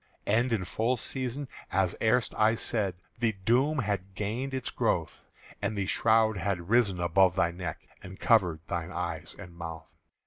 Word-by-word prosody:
"And 115 +4 +2
in 100 -5 0
full 115 +7 0
season, 130 +3 -4 0.2
as 95 -2 +1
erst 115 +2 +2
I 110 +1 +4
said, 105 -5 -1 0.2
The 115 -2 +2
doom 125 +10 +2
had 100 -5 -2
gained 115 +7 -2
its 130 -1 -3
growth; - - -1 0.4
And 110 - -1
the 100 - 0
shroud 110 +1 +3
had 90 0 -2
risen 110 -7 +3
above 90 +1 +4
thy 85 -3 +2
neck 85 -2 -6
And 95 +1 -10
covered 90 -10 +3
thine 85 0 -3
eyes 85 -3 -4
and 90 -4 -10
mouth. 85 -1 -7
100 Hz, 165 wpm, -29 LUFS, 90-115 Hz, 0.4 s, I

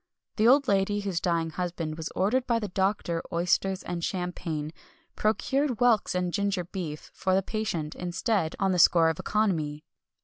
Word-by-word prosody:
The 220 +1 +4
old 275 +2 +5
lady 200 0 +1
whose 195 -4 -2
dying 165 -2 0
husband 170 -2 -3
was 160 0 -5
ordered 230 +8 +1
by 235 -2 +2
the 210 -3 -3
doctor 190 -3 0
oysters 180 +2 +1
and 170 -1 -4
champagne, 170 -5 -3 0.4
procured 260 +4 0
whelks 235 -6 +3
and 180 -1 -1
ginger 200 -2 0
beer 170 -4 -5 0.2
for 185 0 0
the 195 - +2
patient, 180 -8 -3
instead, 180 0 -1
on 195 -1 +1
the 180 - +1
score 165 -1 +6
of 160 - -3
economy. 160 -9 0
185 Hz, 165 wpm, -27 LUFS, 170-210 Hz, 0.4 s, score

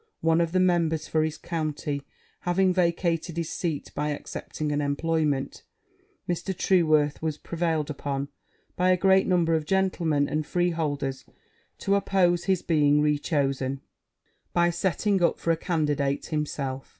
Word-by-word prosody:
One 165 +1 +3
of 165 -1 0
the 185 - +2
members 165 -4 +2
for 155 -1 +1
his 155 0 -2
county 150 -3 -3 0.4
having 185 +1 +2
vacated 170 -1 0
his 170 -2 -2
seat 160 -5 -3
by 150 +1 -1
accepting 150 +1 -4
an 145 0 0
employment, 145 -1 -1 0.7
Mr. 175 +1 -2
Trueworth 155 -5 +2
was 155 -2 -2
prevailed 165 -3 -2
upon, 140 -1 -3 0.5
by 180 +1 +2
a 185 - +4
great 190 +1 +4
number 175 -3 +2
of 160 -1 +1
gentlemen 170 -7 +1
and 155 +1 -1
freeholders, 150 -6 -1 0.5
to 200 - 0
oppose 180 -3 +2
his 190 -3 +1
being 150 -2 +3
rechosen 140 -3 0 0.7
by 175 0 +3
setting 190 +2 0
up 170 - +3
for 165 - 0
a - - +3
candidate 150 -5 0
himself. 140 -4 -3
160 Hz, 140 wpm, -26 LUFS, 145-175 Hz, 0.7 s, a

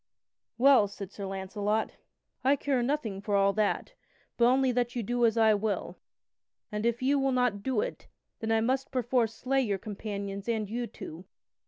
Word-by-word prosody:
"Well," 255 -4 +6
said 195 -1 -8
Sir 200 -1 -6
Launcelot, 200 +3 -2 0.5
"I 270 +2 +4
care 275 -2 0
nothing 240 -7 -1
for 205 0 -1
all 200 0 +4
that, 215 -1 0 0.4
but 235 - +4
only 260 +1 +4
that 245 0 -1
you 240 - -1
do 240 +2 +2
as 225 - 0
I 220 -1 +5
will. 210 0 -2 0.7
And 210 +2 -1
if 235 +2 -1
ye 265 - +3
do 270 -1 +2
not 250 -5 +1
do 250 -2 0
it, - - -5 0.3
then 225 -1 -2
I 225 0 +3
must 260 +3 0
perforce 240 -3 +1
slay 270 +3 +1
your 205 -6 0
companions 200 0 -5
and 220 -2 0
you 235 +3 -3
two. 170 -3 -9
225 Hz, 180 wpm, -29 LUFS, 205-250 Hz, 0.7 s, Well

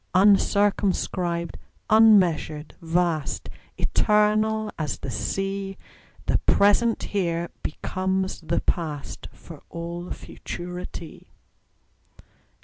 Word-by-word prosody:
Uncircumscribed, 190 -3 +2 0.3
unmeasured, 180 -9 +4
vast, 165 -3 0 0.3
Eternal 215 +1 +2
as 150 -3 -2
the 135 - -6
Sea, 195 - -3 0.5
The - - +2
present 215 +3 +3
here 170 -4 -1
becomes 190 +3 -2
the 165 +1 -1
past, 155 -5 -3
For - - -13
all 170 +1 -6
futurity. 175 -2 -7
185 Hz, 75 wpm, -25 LUFS, 170-205 Hz, 0.5 s, unmeasured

